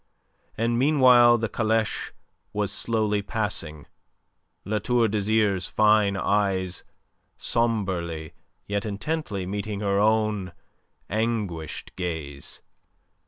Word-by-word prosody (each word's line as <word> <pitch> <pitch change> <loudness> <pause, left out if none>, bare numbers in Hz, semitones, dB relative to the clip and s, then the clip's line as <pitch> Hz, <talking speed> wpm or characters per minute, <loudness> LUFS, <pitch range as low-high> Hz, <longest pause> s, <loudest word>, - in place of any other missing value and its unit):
And 115 +1 +1
meanwhile 125 -4 +6
the 115 0 -1
caleche 110 0 -1 0.4
was 105 -1 -1
slowly 110 -3 0
passing, 100 -9 -3 0.8
La 105 +2 0
Tour 120 +2 +2
d'Azyr's 105 -2 +1
fine 105 -2 +3
eyes 95 -3 0 0.5
sombrely 90 -9 -1 0.3
yet 100 0 -2
intently 105 - -3
meeting 100 +2 -4
her 100 -1 +1
own 105 -3 +1 0.5
anguished 105 -8 -3
gaze. 80 -6 -5
105 Hz, 90 wpm, -25 LUFS, 95-110 Hz, 0.8 s, meanwhile